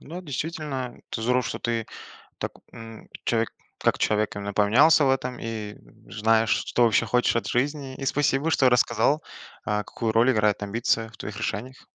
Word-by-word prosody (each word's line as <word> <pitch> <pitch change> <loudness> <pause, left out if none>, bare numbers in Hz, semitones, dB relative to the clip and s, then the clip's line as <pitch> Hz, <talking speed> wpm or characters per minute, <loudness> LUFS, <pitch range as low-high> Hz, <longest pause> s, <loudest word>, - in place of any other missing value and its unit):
Да, 170 +5 -8
действительно, 150 -4 -4 0.2
это 110 - -4
здорово, 125 +2 +2
что - - -4
ты 115 -1 -2 0.5
так, - - -4 0.2
м, 115 -1 -11 0.2
человек 115 -1 +1 0.3
как - - +1
человек 105 0 +1
именно 100 0 -5
поменялся 135 +10 +5
в 135 - +3
этом 125 -2 -1
и 110 -2 -5 0.4
знаешь, 110 +1 +2
что 120 - +2
вообще 115 -2 +3
хочешь 125 -1 +2
от 115 - -1
жизни. 135 +1 -1
И 135 - -5
спасибо, 145 +2 +1
что 130 -4 +4
рассказал, 125 +4 +2 0.4
э, 105 0 0
какую 115 -2 -3
роль 115 +3 +4
играет 105 -3 +1
амбиция 115 +2 0
в 115 - -17
твоих 105 0 -6
решениях. 110 +5 -5
120 Hz, 170 wpm, -25 LUFS, 110-135 Hz, 0.5 s, поменялся